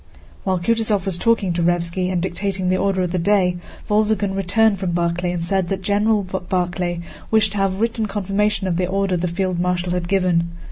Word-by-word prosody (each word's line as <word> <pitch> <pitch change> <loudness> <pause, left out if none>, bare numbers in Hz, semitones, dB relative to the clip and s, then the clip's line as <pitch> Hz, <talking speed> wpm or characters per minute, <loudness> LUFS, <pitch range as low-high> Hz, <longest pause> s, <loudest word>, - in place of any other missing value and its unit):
While 190 -1 +1
Kutúzov 215 0 +1
was 185 -3 0
talking 225 -6 +2
to 170 - -1
Raévski 175 +1 0
and 180 - 0
dictating 190 0 -2
the 185 - +2
order 190 -1 +1
of 180 - -2
the 180 - 0
day, 180 -1 +2 0.3
Wolzogen 210 -2 +1
returned 200 +2 +2
from 185 -2 -2
Barclay 175 +1 0
and 175 -1 -3
said 190 0 0
that 190 +1 -3
General 210 +1 +2
Barclay 180 -1 -2 0.3
wished 220 -2 +3
to 205 - -3
have 195 0 0
written 230 -1 0
confirmation 205 +1 0
of 175 -3 0
the 180 0 0
order 195 0 0
the 180 +1 -1
field 180 0 -1
marshal 180 0 0
had 180 -1 -2
given. 180 -3 +1
185 Hz, 195 wpm, -21 LUFS, 175-200 Hz, 0.3 s, wished